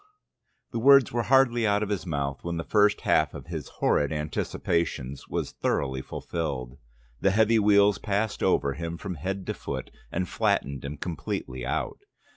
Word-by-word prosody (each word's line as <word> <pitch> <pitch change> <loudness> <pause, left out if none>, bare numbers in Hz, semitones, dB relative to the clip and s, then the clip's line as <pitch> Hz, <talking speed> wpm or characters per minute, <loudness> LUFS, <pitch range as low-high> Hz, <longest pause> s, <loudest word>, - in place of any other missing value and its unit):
The 115 - -2
words 135 +1 +6
were 120 - 0
hardly 125 -4 +4
out 105 +1 +2
of 105 - -3
his 95 -4 -2
mouth, 70 -3 -2
when 85 -1 -3
the 80 - -2
first 105 +1 +3
half - - +2
of - - -8
his - - -6
horrid 75 - +1
anticipations 75 -2 -2
was - - -3
thoroughly 65 -1 -1
fulfilled. 70 -5 -4 0.4
The 95 - +3
heavy 110 +3 +4
wheels 100 -2 +4
passed 105 +1 -1
over 70 - +2
him 85 +3 -5
from 95 +1 -5
head 95 +4 -4
to - - -2
foot - - -6 0.2
and 90 +1 -1
flattened 70 -4 0
him 70 +2 -5
completely 65 -6 -4
out. - - -2
90 Hz, 165 wpm, -27 LUFS, 70-105 Hz, 0.4 s, words